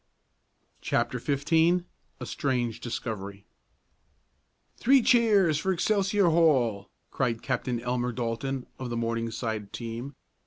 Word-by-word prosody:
CHAPTER - - 0
XV 160 +5 +2 0.4
A - - -5
STRANGE 125 -5 -1
DISCOVERY 110 -5 -5 1.3
"Three 270 +2 +5
cheers 205 - +4
for 190 - 0
Excelsior 195 0 +2
Hall!" 130 -12 +2 0.2
cried 120 -4 -1
Captain 125 -2 -1
Elmer 125 +1 -1
Dalton 125 +2 -3
of 130 -2 -4
the 120 - -3
Morningside 115 -2 -3
team. 120 +4 -6
125 Hz, 105 wpm, -27 LUFS, 115-165 Hz, 1.3 s, Three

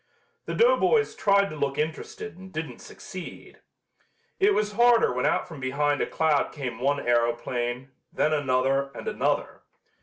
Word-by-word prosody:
The - - -3
doughboys 470 -2 +3
tried 200 -1 +2
to - - -6
look 140 -2 -2
interested 155 -1 -4
and 190 +1 -12
didn't 155 -1 -6
succeed. 185 -2 -10 0.8
It 400 +1 +4
was 210 0 0
harder 235 - +4
when 125 - 0
out - - 0
from 160 -4 -10
behind 145 +2 0
a - - 0
cloud 155 -3 +1
came 125 -5 -5
one 140 +3 +1
aeroplane, 120 +2 -1 0.2
then 155 - +1
another 135 -1 +1
and - - -8
another. - - -1
145 Hz, 150 wpm, -26 LUFS, 130-190 Hz, 0.8 s, It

